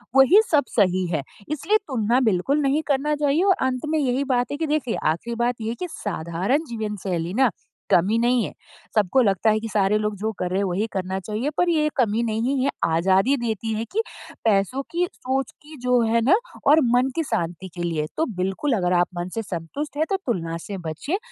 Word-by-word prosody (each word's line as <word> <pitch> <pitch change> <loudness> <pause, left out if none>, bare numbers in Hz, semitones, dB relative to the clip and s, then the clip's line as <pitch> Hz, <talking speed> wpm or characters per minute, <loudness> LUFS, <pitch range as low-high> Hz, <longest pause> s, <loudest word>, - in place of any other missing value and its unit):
वही 270 +11 +7
सब 295 -3 +4
सही 185 -3 +3
है। 150 -4 0 0.3
इसलिए 385 +8 +2
तुलना 240 -2 +1
बिल्कुल 215 +10 +1
नहीं 280 +2 +2
करना 290 +2 +1
चाहिए। 295 +3 +2
और 385 -1 +4
अंत 255 +3 -2
में 315 0 +1
यही 265 0 +1
बात 245 0 0
है 285 - -2
कि 320 +1 -1
देखिए 295 -6 0 0.2
आख़िरी 235 +8 -4
बात 245 +1 0
ये 220 - -2
है 230 - -3
कि 360 - -3
साधारण 195 - -2
जीवन 220 -3 -3
शैली 175 -2 -2
ना 260 - +6 0.4
कमी 195 +6 +4
नहीं 240 0 +3
है। - - -4 0.4
सबको 215 +5 +3
लगता 200 0 +2
है 215 0 +3
कि 225 - -5
सारे 205 0 +2
लोग 210 0 -1
जो 215 +3 -2
कर 180 - -1
रहे 185 - 0
हैं - - +1
वही 190 +4 0
करना 190 0 -2
चाहिए। 215 +8 -3
पर 355 - +3
ये 305 -2 +2
कमी 230 -2 +2
नहीं 235 +4 0
है, 280 - +2 0.2
आज़ादी 190 +10 +3
देती 225 -2 -2
है 220 +1 -2
कि 430 +4 +1 0.4
पैसों 210 +5 +2
की 350 +1 +1
सोच 265 +1 -2
की 305 +1 -12
जो 250 -1 +3
है 230 +1 +2
ना 350 +10 +6 0.3
और 300 +3 +7 0.2
मन 255 +2 +3
की 330 - 0
शांति 175 - -3
के 175 - -4
लिए 160 -3 -1
तो 320 - +2
बिल्कुल 195 +9 0
अगर 180 -1 +1
आप 175 - +3
मन 175 +1 -3
से 225 - -1
संतुष्ट 205 - -5
हैं 315 - +2
तो 390 - +1
तुलना 165 -8 -2
से 200 - -5
बचिए। 280 - -2
230 Hz, 215 wpm, -23 LUFS, 190-280 Hz, 0.4 s, वही